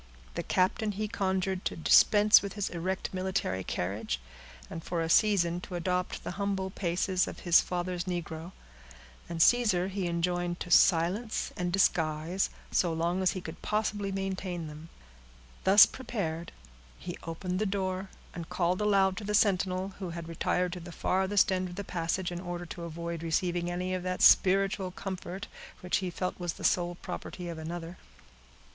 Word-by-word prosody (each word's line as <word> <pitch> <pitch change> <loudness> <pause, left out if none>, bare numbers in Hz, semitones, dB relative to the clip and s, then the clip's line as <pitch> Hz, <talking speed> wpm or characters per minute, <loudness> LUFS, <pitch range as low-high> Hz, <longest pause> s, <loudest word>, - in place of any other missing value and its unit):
The - - -2
captain 205 +3 +1
he 210 +2 -2
conjured 190 -2 -1
to - - -1
dispense 210 +5 +6
with 200 - -5
his 205 -2 -2
erect 185 +3 -3
military 185 - -1
carriage, 95 - -3 0.5
and 165 - -7
for 175 - -2
a - - -2
season 180 -3 +3
to 180 - -7
adopt 180 +1 -2
the - - -4
humble 195 -1 -1
paces 185 0 0
of - - -8
his 175 -2 +6
father's 180 0 -3
negro; 170 -1 -4 0.8
and 170 -1 -4
Caesar 210 -7 +3
he 190 -2 -2
enjoined 175 +1 -1
to 175 - -6
silence 185 +8 +3
and 180 0 -2
disguise, 165 -1 +1 0.2
so 175 - +2
long 170 +3 0
as 185 - +2
he 185 - -5
could 165 -1 -9
possibly 210 -2 -1
maintain 190 -3 -3
them. 155 +2 -10 0.8
Thus 195 +2 +9
prepared, 175 -10 -4 0.5
he 175 -1 -6
opened 180 +3 -4
the 215 - +1
door, 190 -1 -2 0.2
and 170 -2 -7
called 180 +1 0
aloud 195 -2 +3
to 220 - -5
the 210 +1 -1
sentinel, 190 -2 +2
who 185 -3 -4
had 170 -1 -6
retired 175 +2 0
to 180 - -5
the 175 0 -9
farthest 190 +3 +2
end 185 -1 -1
of 175 - -9
the 200 - -4
passage, 175 0 -2
in 175 - -4
order 175 -1 -5
to 170 0 -7
avoid 170 0 -5
receiving 175 +1 0
any 180 +1 -2
of 185 - -2
that 185 0 -2
spiritual 195 0 +5
comfort, 190 +1 -6 0.4
which 180 - +1
he 185 -2 -2
felt 180 +1 -3
was 175 -2 -2
the - - -11
sole 175 -1 +2
property 180 0 -7
of 165 -1 -6
another. 170 +2 -6
180 Hz, 170 wpm, -30 LUFS, 170-190 Hz, 0.8 s, Thus